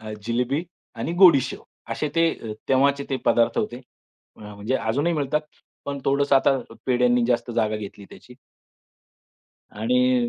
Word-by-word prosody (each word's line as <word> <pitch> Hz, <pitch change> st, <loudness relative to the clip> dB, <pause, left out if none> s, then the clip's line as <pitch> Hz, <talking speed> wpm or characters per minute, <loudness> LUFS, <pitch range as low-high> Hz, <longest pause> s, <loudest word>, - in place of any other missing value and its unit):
अ, 110 Hz, -1 st, -7 dB
जिलेबी 125 Hz, +7 st, -1 dB, 0.3 s
आणि 165 Hz, -, -3 dB
गोडी 170 Hz, -7 st, +8 dB
शेव -, -, -6 dB, 0.3 s
असे 150 Hz, -, -2 dB
ते 165 Hz, 0 st, +4 dB, 0.2 s
अ, -, -, -2 dB, 0.2 s
तेव्हाचे 140 Hz, +1 st, +2 dB
ते 135 Hz, -, +1 dB
पदार्थ 115 Hz, 0 st, +2 dB
होते. 120 Hz, -, -2 dB, 0.6 s
अ, -, -, -18 dB
म्हणजे 105 Hz, +5 st, -3 dB
अजूनही 135 Hz, +10 st, 0 dB
मिळतात, 150 Hz, 0 st, 0 dB, 0.4 s
पण 140 Hz, 0 st, -4 dB
थोडंसं 140 Hz, 0 st, +3 dB
आता 135 Hz, 0 st, +3 dB, 0.3 s
पेढ्यांनी 125 Hz, -1 st, +3 dB
जास्त 120 Hz, 0 st, 0 dB
जागा 110 Hz, -2 st, 0 dB
घेतली 100 Hz, -1 st, -9 dB
त्याची. 125 Hz, -, -14 dB, 1.4 s
आणि 125 Hz, +2 st, +1 dB
125 Hz, 145 wpm, -23 LUFS, 115-140 Hz, 1.4 s, गोडी